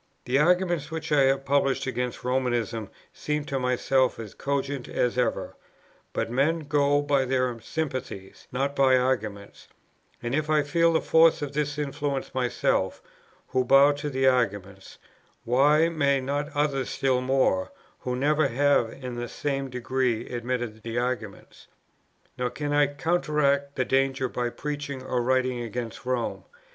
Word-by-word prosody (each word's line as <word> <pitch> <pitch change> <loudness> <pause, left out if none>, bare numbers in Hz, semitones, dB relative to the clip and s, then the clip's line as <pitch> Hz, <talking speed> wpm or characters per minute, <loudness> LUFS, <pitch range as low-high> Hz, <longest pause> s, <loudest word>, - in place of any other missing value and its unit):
"The 130 +2 +2
arguments 175 -1 +2
which 160 -1 -5
I 140 -2 +5
have 135 0 +1
published 135 -1 +1
against 125 -1 -3
Romanism 120 -4 -1 0.2
seem 150 -1 -3
to 135 -2 -2
myself 130 +1 +1
as 110 -3 -8
cogent 140 -1 -3
as 120 -1 0
ever, 125 -1 -1 0.6
but - - -2
men 150 +6 +1
go 145 -1 +2
by 140 -2 +2
their 125 -2 0
sympathies, 130 - -5
not 140 +3 -1
by 130 -2 +5
argument; 110 -6 -2 0.6
and 120 +1 -2
if 155 +1 0
I 155 -1 +3
feel 165 +3 +2
the 160 - +2
force 160 -1 +4
of 145 -1 -5
this 145 0 -1
influence 140 -1 -3
myself, 125 -2 0 0.5
who 130 - +1
bow 135 +3 +6
to 145 +1 -4
the 135 -1 0
arguments, 100 -7 0 0.5
why 145 +6 +4
may 140 -4 +1
not 145 +3 -3
others 140 -3 0
still 130 -2 +1
more, 130 -8 +1 0.3
who 125 0 -3
never 150 +3 +2
have 135 -2 +2
in 130 -2 -7
the 120 0 -4
same 135 -2 -3
degree 125 -2 -1
admitted 120 -2 -3
the 115 +1 -5
arguments? 120 -5 -4 0.7
"Nor 125 0 0
can 145 +4 -3
I 145 0 +4
counteract 145 -2 0
the 130 - 0
danger 135 0 +1
by 120 0 -2
preaching 145 0 -5
or 125 -1 -1
writing 130 0 +1
against 120 +2 -6
Rome. 125 -2 -2
135 Hz, 150 wpm, -26 LUFS, 125-145 Hz, 0.7 s, bow